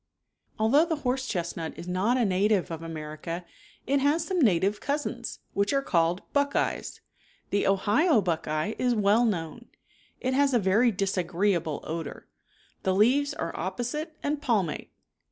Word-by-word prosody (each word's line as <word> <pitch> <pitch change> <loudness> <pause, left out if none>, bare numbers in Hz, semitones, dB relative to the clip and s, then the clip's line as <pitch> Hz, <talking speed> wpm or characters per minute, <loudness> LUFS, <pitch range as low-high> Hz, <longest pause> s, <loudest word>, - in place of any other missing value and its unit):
Although 250 +9 +4
the 330 -1 -1
horse 260 +1 0
chestnut 170 -5 -3
is 170 - -8
not 190 +8 +1
a 245 - +2
native 195 -1 +2
of 165 -1 -5
America 165 +1 -6 0.4
it 275 +1 +1 0.2
some 355 +2 -1
native 200 - +3
cousins, 280 -4 -3
which 200 +6 +1
called 170 +1 +1
buckeyes. 285 0 0 0.5
The 200 - +1
Ohio 215 - +3
buck 175 -5 -1
eye 155 +7 -1
is 250 -1 +2
well 210 +3 +4
known. 205 +3 -3 0.5
It 255 0 -1
has 275 -1 +3
a - - +6
very 210 +5 +3
disagreeable 185 -4 0
odor. 165 -1 -6 0.5
The 190 -1 +1
leaves 260 +8 +3
are - - -4
opposite 245 - -4
and 290 0 -1
palmate. 215 - 0
205 Hz, 140 wpm, -27 LUFS, 175-255 Hz, 0.5 s, a